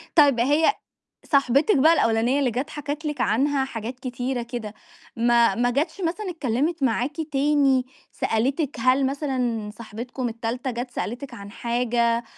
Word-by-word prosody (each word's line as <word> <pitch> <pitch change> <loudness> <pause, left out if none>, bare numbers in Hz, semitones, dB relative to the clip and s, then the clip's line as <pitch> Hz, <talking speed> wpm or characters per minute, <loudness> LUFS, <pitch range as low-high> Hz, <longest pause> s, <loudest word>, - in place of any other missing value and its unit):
طيب 285 -7 +5
هي 295 - +4 0.5
صاحبتِك 280 - +3
بقى 310 +4 +6
الأولانية 235 -2 +2
اللي 270 -3 +2
جت 260 +7 -3
حكِت 295 +1 -5
لِك 295 -3 -3
عنها 270 +4 +2
حاجات 245 0 -6
كتيرة 250 0 -3
كده، 235 -3 -6 0.4
ما 235 -2 +4
ما 245 +3 +1
جتش 290 +10 -1
مثلًا 365 +3 -2
اتكلمت 300 +1 -1
معاكِ 260 +3 0 0.2
تاني 275 -2 +3 0.3
سألتِك 270 +6 -1
هل 255 +3 +3
مثلًا 255 -6 -2
صاحبتكم 235 +3 -6
التالتة 230 +3 -3
جت 245 +1 -4
سألتِك 245 +3 -5
عن 200 0 -9
حاجة 235 0 0
255 Hz, 140 wpm, -24 LUFS, 235-285 Hz, 0.5 s, بقى